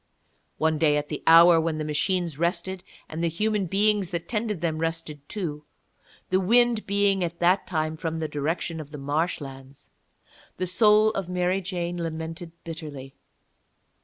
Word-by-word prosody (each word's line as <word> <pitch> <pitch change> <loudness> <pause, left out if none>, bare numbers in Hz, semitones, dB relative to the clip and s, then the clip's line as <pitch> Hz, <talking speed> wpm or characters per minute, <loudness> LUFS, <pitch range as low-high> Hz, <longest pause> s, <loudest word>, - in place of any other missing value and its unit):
One 160 -1 +1
day 150 -2 +4
at 145 0 -3
the - - -4
hour 165 0 +8
when 160 -1 -1
the 155 - -2
machines 160 +1 -1
rested 175 +2 -1 0.2
and 160 +2 -5
the - - +3
human 210 +3 0
beings 205 0 +2
that 170 -2 -4
tended 215 -4 -2
them 160 -1 -1
rested 165 -2 -3
too, 155 -8 -4 0.7
the 185 - +4
wind 235 +3 +3
being 200 -1 +2
at 170 0 -3
that 180 +3 +2
time 155 -2 -1
from 165 -1 -3
the 160 -1 -2
direction 160 +3 -2
of 150 -2 -8
the 150 - -8
marshlands, 140 -2 -4 0.7
the 185 - -1
soul 210 +4 +5
of 195 -4 -4
Mary 180 +1 0
Jane 175 -2 -3
lamented 165 +1 -5
bitterly. 150 -5 -8
170 Hz, 160 wpm, -26 LUFS, 155-190 Hz, 0.7 s, hour